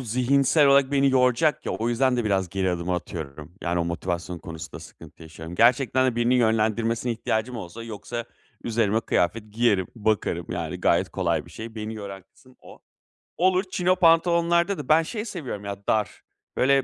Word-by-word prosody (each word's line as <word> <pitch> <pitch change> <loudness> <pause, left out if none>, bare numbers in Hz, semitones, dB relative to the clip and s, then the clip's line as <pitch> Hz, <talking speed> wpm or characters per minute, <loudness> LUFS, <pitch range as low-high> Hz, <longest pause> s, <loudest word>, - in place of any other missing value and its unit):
zihinsel 130 +5 +3
olarak 140 0 +5
beni 140 -1 +3
yoracak 130 +4 +2
ya, - - -1
o 115 - -2
yüzden 125 +1 +2
de 120 - -1
biraz 95 -3 0
geri 95 0 -1
adım 90 0 -3
atıyorum. 80 -3 -5
Yani 85 0 0
o - - 0
motivasyon 85 0 -3
konusunda 85 -3 -8
sıkıntı 80 0 -14
yaşıyorum. 80 +1 -9
Gerçekten 125 +3 +3
de 120 -2 -1
birinin 120 +2 +2
yönlendirmesine 115 +1 +1
ihtiyacım 115 +2 -2
olsa, 110 +3 -8
yoksa 115 +1 -6 0.4
üzerime 110 -2 +1
kıyafet 105 +2 -1
giyerim 105 -5 +2
bakarım, 110 -1 -1
yani - - -4
gayet - - +2
kolay - - -1
bir - - -14
şey 110 0 -8
beni 110 0 -5
yoran 100 -3 -8
kısım 130 +6 -24
o. - - -14 0.6
Olur 185 +1 +3
chino 180 0 +2
pantolonlarda 170 +2 +3
da 145 -2 -7
ben 160 +2 +5
şey 210 +5 -5
seviyorum 135 - -6
ya, 100 - -3
dar 105 -3 0 0.4
böyle 135 +1 +3
115 Hz, 170 wpm, -25 LUFS, 100-135 Hz, 0.6 s, olarak